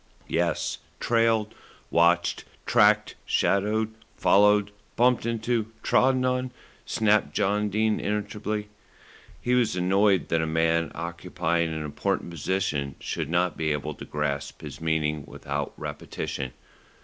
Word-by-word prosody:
"Yes, - - 0 0.2
trailed, 115 -2 +2 0.4
watched, 85 0 +3 0.2
tracked, 105 0 +4
shadowed, 110 +2 +1 0.2
followed, 105 0 +4 0.2
bumped 125 -1 +3
into, 115 -1 0 0.2
trodden 130 0 +3
on," 125 0 0 0.4
snapped 105 -1 +2
John 105 +1 +1
Dene 110 +1 +1
irritably. 105 0 -3 0.7
He 125 +6 0
was 120 -7 +2
annoyed 95 +2 +2
that 80 0 +2
a 80 - -1
man 80 +1 +1
occupying 85 -1 -1
an 80 -1 -3
important 75 +3 -2
position 75 -5 -1
should - - -3
not 90 +1 +1
be 80 -1 -1
able 75 +1 -2
to - - -10
grasp 70 -2 -3
his - - -8
meaning 75 -2 0
without 70 +1 -4
repetition. 75 -3 -5
95 Hz, 120 wpm, -26 LUFS, 80-105 Hz, 0.7 s, tracked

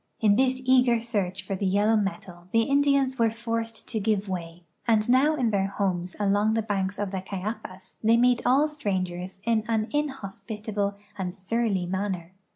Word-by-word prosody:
In 210 -2 +4
this 260 +2 +2
eager 250 -2 +4
search 195 -5 -2
for 195 - -2
the 195 +1 -1
yellow 205 +4 +3
metal 195 -4 -3
the 225 +3 +2
In 280 +1 +4
dians 275 -2 +2
were 230 -1 +4
forced 230 0 -4
to 225 - -1
give 210 -1 0
way, 175 -2 -5 0.2
and 220 -2 +3
now 270 +5 +4
in 245 -6 +1
tiieir 195 -1 +1
homes 185 -3 -2
along 205 +2 +2
the 225 - +1
banks 200 -2 -1
of 205 -2 -2
the 190 -1 -3
Cayapas 190 -1 -6
the}'' 225 +1 +5
meet 245 0 +4
all 275 +5 +4
strangers 190 -10 -3
in 225 -1 +1
an 225 -1 0
inhospitable 215 -7 -3 0.2
and 180 -1 -3
surly 200 -1 -1
manner. 185 -2 -3
210 Hz, 175 wpm, -26 LUFS, 190-235 Hz, 0.2 s, the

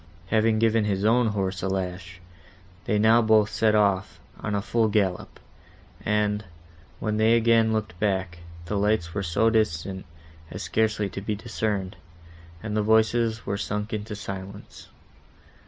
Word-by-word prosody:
Having 110 0 +2
given 115 -1 +2
his 100 -1 -1
own 120 +2 +4
horse 95 -3 -2
a 95 - -2
lash, 90 -2 -4 0.7
they 105 - +1
now 110 +2 +5
both 110 -2 +3
set 110 -1 +2
off 100 -2 +1 0.2
on 105 - -3
a 100 - 0
full 115 +1 +1
gallop; 100 -4 -1 0.6
and, 105 0 0 0.6
when 105 -1 -1
they 110 +1 +4
again 115 -1 +3
looked 110 -5 -3
back, 95 -4 -1 0.3
the 100 +3 -2
lights 100 -5 0
were 100 - -2
so 100 +5 +1
distant 95 -3 -1 0.4
as - - -6
scarcely 110 -2 0
to 100 - -6
be 105 +1 -2
discerned, 105 -4 -3 0.7
and 110 -1 -3
the 105 - +2
voices 110 +1 +2
were 100 - -2
sunk 105 +2 -3
into 105 0 -4
silence. 100 0 -8
105 Hz, 150 wpm, -25 LUFS, 95-110 Hz, 0.7 s, now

